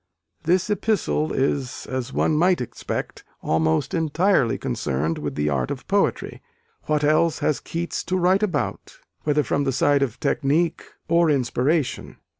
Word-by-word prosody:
This 180 Hz, +3 st, +2 dB
epistle 205 Hz, -6 st, 0 dB
is, 135 Hz, -1 st, -1 dB
as 130 Hz, -1 st, -4 dB
one 155 Hz, -, +1 dB
might 175 Hz, +4 st, +3 dB
expect, 125 Hz, -, -5 dB, 0.2 s
almost 80 Hz, 0 st, +1 dB
entirely 165 Hz, -, +2 dB
concerned 70 Hz, +5 st, -2 dB
with 75 Hz, -1 st, -4 dB
the 75 Hz, 0 st, 0 dB
art 70 Hz, -4 st, 0 dB
of -, -, -6 dB
poetry -, -, 0 dB, 0.5 s
what 150 Hz, -1 st, +1 dB
else 155 Hz, +2 st, +3 dB
has 150 Hz, -, 0 dB
Keats 170 Hz, +1 st, -4 dB
to 185 Hz, -, 0 dB
write 185 Hz, +2 st, +3 dB
about? 210 Hz, -, -2 dB, 0.3 s
whether 150 Hz, 0 st, +2 dB
from 140 Hz, +3 st, 0 dB
the 135 Hz, -, 0 dB
side 140 Hz, +2 st, +2 dB
of 130 Hz, -6 st, -1 dB
technique, 155 Hz, +5 st, 0 dB, 0.2 s
or 170 Hz, 0 st, +3 dB
inspiration. 140 Hz, +2 st, 0 dB
150 Hz, 145 wpm, -23 LUFS, 125-170 Hz, 0.5 s, might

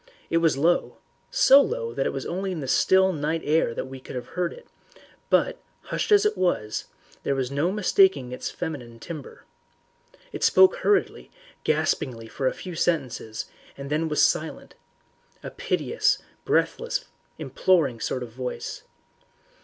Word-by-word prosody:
It 165 Hz, -, +3 dB
was 165 Hz, -4 st, +2 dB
low 170 Hz, +5 st, +1 dB, 0.3 s
so 285 Hz, -, +7 dB
low 115 Hz, -, -2 dB
that 135 Hz, -, 0 dB
it -, -, -1 dB
was 135 Hz, -1 st, -5 dB
only 190 Hz, +2 st, -3 dB
in 175 Hz, -, -4 dB
that 135 Hz, -, -5 dB
still 190 Hz, 0 st, +4 dB
night 155 Hz, +1 st, -2 dB
air 150 Hz, -6 st, +2 dB
that -, -, -3 dB
we 130 Hz, 0 st, -9 dB
could 130 Hz, -, -10 dB
have 125 Hz, 0 st, -6 dB
heard 180 Hz, 0 st, -2 dB
it, -, -, -12 dB, 0.6 s
but, -, -, +2 dB, 0.2 s
hushed -, -, -3 dB
as 415 Hz, 0 st, +6 dB
it 425 Hz, -, +2 dB
was, 110 Hz, -12 st, -1 dB, 0.4 s
there 140 Hz, -, -1 dB
was 130 Hz, -1 st, -2 dB
no 145 Hz, +6 st, +1 dB
mistaking 190 Hz, -9 st, +3 dB
its 125 Hz, -, -4 dB
feminine 130 Hz, -9 st, -6 dB
timbre. 155 Hz, +1 st, -9 dB, 0.9 s
It -, -, -5 dB
spoke 380 Hz, +6 st, +6 dB
hurriedly, 415 Hz, -5 st, 0 dB, 0.3 s
gaspingly 115 Hz, -4 st, 0 dB
for 130 Hz, +3 st, -2 dB
a -, -, +1 dB
few 180 Hz, -, -7 dB
sentences, 135 Hz, -10 st, -2 dB, 0.3 s
and 140 Hz, +1 st, -7 dB
then 160 Hz, +2 st, 0 dB
was 150 Hz, -, +3 dB
silent -, -, 0 dB, 0.7 s
a -, -, -6 dB
piteous, 470 Hz, -, 0 dB, 0.3 s
breathless, 485 Hz, +1 st, 0 dB, 0.3 s
imploring 155 Hz, -11 st, +1 dB
sort 125 Hz, -, -2 dB
of 120 Hz, -, -9 dB
voice. 125 Hz, +2 st, -5 dB
155 Hz, 155 wpm, -25 LUFS, 130-190 Hz, 0.9 s, so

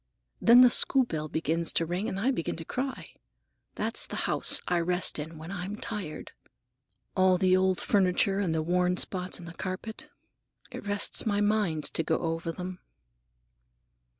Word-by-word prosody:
Then 235 Hz, +2 st, +7 dB
the 250 Hz, -1 st, +7 dB
school 265 Hz, +2 st, +5 dB
bell 155 Hz, -7 st, -4 dB
begins 165 Hz, +2 st, 0 dB
to 165 Hz, -, +1 dB
ring 180 Hz, +7 st, -3 dB
and 190 Hz, -, -4 dB
I 250 Hz, +7 st, +1 dB
begin 200 Hz, -11 st, -3 dB
to 165 Hz, -, -9 dB
cry. 260 Hz, +5 st, -4 dB, 0.7 s
That's -, -, -2 dB
the -, -, -7 dB
house -, -, +3 dB
I 175 Hz, -1 st, +1 dB
rest 175 Hz, -1 st, +2 dB
in 160 Hz, +2 st, -7 dB
when 160 Hz, +3 st, -9 dB
I'm 195 Hz, +1 st, -5 dB
tired. 210 Hz, -10 st, -6 dB, 0.8 s
All 185 Hz, -1 st, +4 dB
the 185 Hz, 0 st, +3 dB
old 185 Hz, 0 st, +1 dB
furniture 195 Hz, 0 st, +1 dB
and 190 Hz, -5 st, -1 dB
the 160 Hz, -1 st, -1 dB
worn 180 Hz, +2 st, +1 dB
spots 185 Hz, -1 st, -2 dB
in 175 Hz, -, -11 dB
the 165 Hz, -, -9 dB
carpet—it 195 Hz, +2 st, -10 dB
rests 205 Hz, +2 st, +2 dB
my 205 Hz, -1 st, +1 dB
mind 205 Hz, -7 st, 0 dB
to -, -, 0 dB
go 160 Hz, 0 st, 0 dB
over 165 Hz, 0 st, -3 dB
them." 180 Hz, +1 st, -7 dB
185 Hz, 165 wpm, -28 LUFS, 165-205 Hz, 0.8 s, Then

